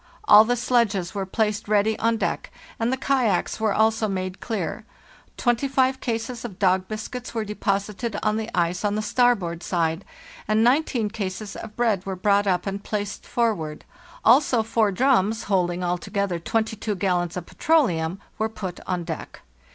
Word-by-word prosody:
All 215 - +8
the 245 +2 +1
sledges 220 -7 +1
were 195 -2 -3
placed 215 +1 -1
ready 210 +1 +2
on 230 0 +2
deck, - - -2 0.3
and 230 +2 +1
the 260 - 0
kayaks 260 -6 +1
were 220 -1 +1
also 220 +1 +2
made 185 -1 -3
clear; 225 -4 -3 0.5
25 260 +2 +1
cases 230 0 -3
of 210 -7 -7
dog 185 -1 +2
biscuits 235 +3 -6
were 220 -1 -1
deposited 205 +1 -2
on 215 0 +1
the 220 0 -3
ice 175 +2 +1
on 205 0 +1
the 215 - -1
starboard 205 -7 +1
side, 165 0 -1 0.4
and 215 +1 +3
19 245 -4 +2
cases 200 -1 -5
of 220 -2 -8
bread 220 -6 +1
were 195 -1 -4
brought 200 +2 +2
up 180 -2 +1
and 200 0 -4
placed 205 -2 -4
forward; 190 -11 -1 0.4
also 245 -1 +5
4 220 -2 +1
drums, 220 -1 +2
holding 180 -2 0
altogether 180 +1 -1
22 220 +2 -1
gallons 180 -2 0
of 175 - -5
petroleum, 185 - +1 0.2
were 220 0 +1
put 190 -5 -6
on 180 -2 -1
deck. 165 -2 -7
210 Hz, 160 wpm, -24 LUFS, 185-230 Hz, 0.5 s, All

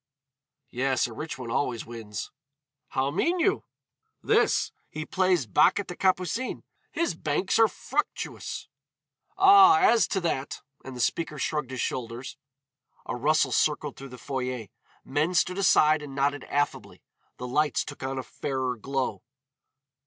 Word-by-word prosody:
"Yes, 130 +1 +1
a 115 - -6
rich 155 +7 -6
one 125 -3 -6
always 120 -4 -1
wins." 115 -3 -7 0.6
"How 135 +1 -1
mean 340 - +1
you?" 390 +5 +1 0.6
"This: - - +2 0.2
he 155 0 -5
plays 185 -6 +1
bac 110 - +4
at 200 - -4
the 180 - -5
Capucines. 185 +7 0 0.3
His 335 - 0
banks 165 +6 0
are 225 - +7
fructuous." - - -4 0.7
"Ah, 390 0 +8
as 305 - +4
to 195 - -1
that 140 -5 -2
" 140 - -37
And 130 -1 -8
the - - -8
first 120 - +4
speaker 165 -2 -3
shrugged 150 -1 -2
his 130 -2 -4
shoulders. 120 +1 -4 0.7
A - - -3
rustle 150 +6 +2
circled 150 -2 +1
through 135 0 -10
the 125 - -10
foyer, 125 -5 -4 0.4
men 150 +6 0
stood 180 +2 +2
aside 155 -5 +4
and 140 -2 -8
nodded 140 0 0
affably. 145 0 -2 0.3
The 125 - -6
lights 150 +4 +1
took 145 - -9
on 135 0 -3
a 130 - -3
fairer 130 -3 -3
glow. 135 +3 -2
145 Hz, 150 wpm, -27 LUFS, 130-180 Hz, 0.7 s, Ah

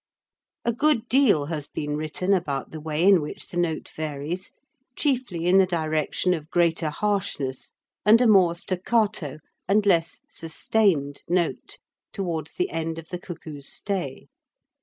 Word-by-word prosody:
A 235 - +2
good 290 -2 +2
deal 235 - +4
has 150 -2 -4
been 150 -1 -3
written 155 +5 0
about 145 -8 -1
the 160 - -6
way 155 +1 -1
in 190 -3 +6
which 150 - -6
the 175 - -6
note 170 -3 -1
varies, 155 +4 -4 0.4
chiefly 245 - 0
in 185 +2 +6
the 190 - +5
direction 160 +1 0
of 155 -2 -5
greater 165 -2 +2
harshness 150 -8 -2 0.3
and 215 +3 +7
a 250 - +4
more 190 -6 +5
staccato 185 - -1 0.3
and 205 +1 +3
less 170 -3 +2
sustained 165 -3 0
note, 175 -1 -1 0.4
towards 165 -6 -3
the 365 +1 -1
end 165 0 -3
of 165 0 -9
the 180 - -4
cuckoo's 155 -6 -7
stay. 185 -10 -4
170 Hz, 145 wpm, -25 LUFS, 155-200 Hz, 0.4 s, and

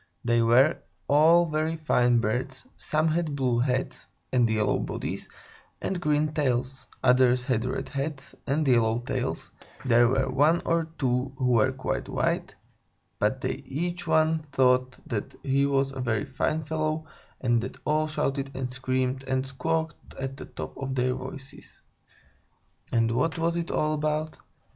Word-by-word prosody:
They 120 -1 +3
were 125 +7 +5 0.3
all 160 +4 +6
very 155 0 -1
fine 125 -6 +3
birds; 125 +4 -2
some 155 +1 0
had 160 -2 -1
blue 125 -4 +1
heads 130 +1 -1 0.3
and 120 -3 +4
yellow 110 -1 +1
bodies - - -4 0.5
and 185 -2 -3
green 150 -1 +1
tails; 130 -3 -1 0.2
others 125 -1 +4
had 125 -2 0
red 130 - -3
heads 140 -1 -4
and 145 +2 +1
yellow 115 -3 +3
tails; - - -3 0.3
there 120 -1 +5
were 130 +2 +1
one 145 +6 +3
or 165 -1 +1
two 130 0 0
who 125 -1 +1
were 120 +2 +4
quite 130 0 -3
white, - - -1 0.6
but - - +1
they - - -1
each 175 +6 -4
one 160 0 +2
thought 130 -1 +2
that 105 -4 -4
he 140 +1 +2
was 135 -1 +1
a 135 -1 -5
very 120 +1 0
fine 150 +3 -1
fellow, 155 +1 -2 0.3
and 120 -2 +2
they - - -3 0.2
all 155 +1 +2
shouted 135 -2 -1
and 130 -1 -3
screamed 130 0 -1
and 130 0 0
squawked 160 +4 -3
at 135 0 -4
the - - -8
top - - -8
of 135 -1 -3
their 125 0 +1
voices. 130 +1 -9 1.1
And 115 -1 +2
what 130 +8 0
was 165 +1 0
it 170 0 -2
all 155 0 +1
about? 155 +1 -2
135 Hz, 155 wpm, -27 LUFS, 125-155 Hz, 1.1 s, all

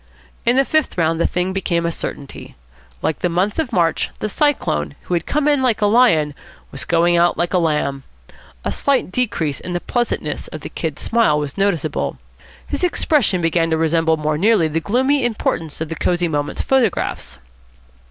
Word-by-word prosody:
In 240 - +5
the 270 +1 +4
fifth 310 -4 0
round 165 -1 +1
the - - +3
thing 180 +1 -1
became 170 -3 -1
a 170 - 0
certainty. 140 -3 -7 0.5
Like 160 - -1
the 180 - 0
month 185 - 0
of 300 -6 -1
March, 170 -6 +1
the 215 - -3
Cyclone, 75 - 0
who - - -4
had 170 -1 -1
come 300 0 0
in 290 -2 +3
like 240 -4 +2
a 210 - +2
lion, 205 -10 +4 0.4
was 140 - -4
going 170 0 +3
out 175 +1 +3
like 175 +1 -1
a 180 - +4
lamb. 150 -4 0 0.6
A - - 0
slight 275 -9 0
decrease 180 - -1
in 180 - -6
the 175 - 0
pleasantness 205 - -2
of 155 - -8
the - - -7
Kid's 160 -4 -4
smile 230 -10 +3
was 145 -2 -3
noticeable. 175 -7 -1 0.5
His - - -4
expression 295 - +2
began 165 0 +1
to 160 - +1
resemble 160 0 +2
more 150 0 -1
nearly 205 -3 +4
the 155 +1 -1
gloomy 260 - +1
importance 165 -10 -2
of 160 - -3
the 165 - -4
Cosy 175 +2 0
Moments 145 -2 -2
photographs. 225 - 0
175 Hz, 185 wpm, -19 LUFS, 160-230 Hz, 0.6 s, In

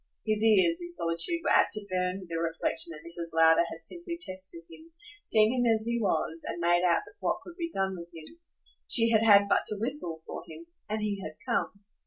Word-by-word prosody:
His 215 -1 0
ears, 225 - +4
in 345 0 -7
solitude, 170 - -1
were - - 0
apt - - +4
to 210 -1 +1
burn 185 0 -2
with 180 - -13
the 165 0 -3
reflexion 165 0 0
that 155 -2 -10
Mrs. 170 -1 -3
Lowder 165 +1 +5
had 165 - -10
simply 340 - -4
tested 185 - -4
him, 320 - -15 0.3
seen 215 +1 +3
him 245 -2 +2
as 220 0 0
he 235 0 -1
was 165 -4 -1
and - - -5
made 175 +1 +2
out 175 -2 +2 0.2
what - - -1
could 345 - -12
be 340 -2 -4
done 190 -4 -1
with 170 -1 -10
him. 165 - -13 0.5
She 230 -1 +5
had 220 -1 +4
had 200 -2 +6
but - - +1
to 210 - -1
whistle 215 - +1
for - - -7
him 160 +1 -11 0.2
and 215 0 -2
he 200 -2 -2
had 155 - -7
come. 235 -4 -2
195 Hz, 220 wpm, -28 LUFS, 170-230 Hz, 0.5 s, had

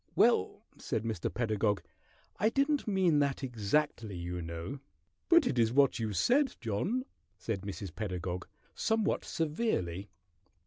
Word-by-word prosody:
"Ahem! - - -37
Well," - - +3 0.2
said 110 - -2
Mr. 110 -7 -2
Pedagog, 110 -3 0 0.5
"I 215 - +3
didn't 280 +2 +1
mean 185 -7 +3
that 140 -1 0
exactly, 115 -2 0
you 90 +1 -4
know 85 +11 -5 0.2
" 95 +3 -47
"But 340 -2 +7
it's 115 -2 +3
what 140 -1 +4
you 110 -2 -1
said, 255 - +3
John," 180 - -1 0.3
said 110 -4 -3
Mrs. 100 -2 -6
Pedagog, 90 -3 -3 0.3
somewhat 225 -2 +1
severely. 145 - -1
115 Hz, 135 wpm, -32 LUFS, -, 0.5 s, But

